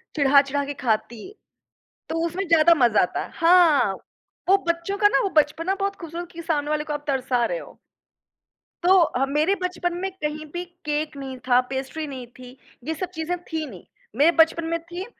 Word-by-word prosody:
चिढ़ा-चिढ़ा 280 -1 +3
के 285 - -4
ख़ाती 220 -1 -1 0.9
तो 330 - -2
उसमें 365 +4 -3
ज़्यादा 330 0 +6
मज़ा 230 -3 +4
आता 180 - -1
है। - - -11
हाँ, 330 - +4 0.5
वो 390 - +7
बच्चों 340 +4 -1
का 415 - +5
ना - - +2
वो 395 - -1
बचपना 310 +5 +2
बहुत 395 0 -2
ख़ूबसूरत 340 +1 -7
कि 335 - -8
सामने 300 -3 -1
वाले 305 0 0
को 305 - -5
आप 295 0 -5
तरसा 255 -3 0
रहे - - -3
हो। - - -12 1.1
तो 375 +2 +6
अ, 270 -6 +2
मेरे 300 +7 +1
बचपन 355 -1 -2
में 380 +2 -2
कहीं 305 0 -3
भी 350 0 -3 0.2
केक 300 0 -2
नहीं 265 -1 -6
था, 250 -1 +5
पेस्ट्री 270 +4 -4
नहीं 260 -3 -7
थी। 255 +1 -12 0.3
ये 315 +5 -2
सब 360 +3 -4
चीजें 320 +3 -2
थी 320 -1 -2
नहीं। 185 -7 -12 0.3
मेरे 295 +7 +5
बचपन 325 +1 +4
में 335 0 -1
थी 350 +3 -7
310 Hz, 190 wpm, -23 LUFS, 275-345 Hz, 1.1 s, वो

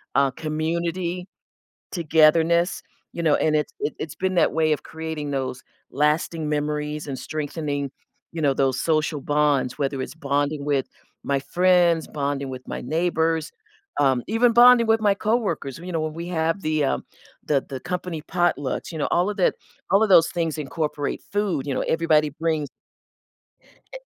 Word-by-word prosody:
uh, 140 -1 +4
community, 170 +4 -2 0.7
togetherness, 165 +1 +3 0.3
you 170 - -4
know, 155 -3 +4
and 155 - +1
it 150 -1 +1
it 150 - -2
it's 160 0 -5
been 190 0 -1
that - - +4
way 155 -1 +2
of 150 - -1
creating 160 -2 -5
those 130 -2 -3 0.3
lasting 150 +2 0
memories 150 0 -2
and 135 -2 -4
strengthening, 145 -2 -3 0.4
you 165 - -5
know, 140 -2 +3
those 135 -1 +1
social 155 -2 0
bonds, 145 -3 +1
whether 135 -1 -1
it's - - -7
bonding 145 0 -1
with 140 -2 0 0.4
my 140 -1 +1
friends, 175 +2 +3
bonding 140 -1 -2
with 130 0 -8
my - - -4
neighbors, 160 +2 0 0.5
um, 130 -3 +3
even 230 +2 +3
bonding 240 0 +7
with 225 0 +4
my 205 -2 +3
coworkers, 200 - -1
you 175 +2 -8
know, 165 - 0
when 155 -1 -2
we 170 +1 -6
have 165 +1 0
the, 155 -2 +1
um, - - 0 0.4
the 140 -3 +1
the 130 -1 -5
company 180 -3 -4
potlucks, 175 -5 -1
you 160 - -5
know, 145 - 0
all 180 +4 +2
of 205 - -5
that 180 - +3 0.4
all 195 +3 +5
of 220 - +3
those 165 -3 +7
things 165 -3 -2
incorporate 150 0 -3
food, 195 -9 0
you 140 - -1
know, - - -1
everybody 160 -2 +2
brings 155 -1 -1 1.3
Eh - - -8
155 Hz, 165 wpm, -23 LUFS, 145-170 Hz, 1.3 s, bonding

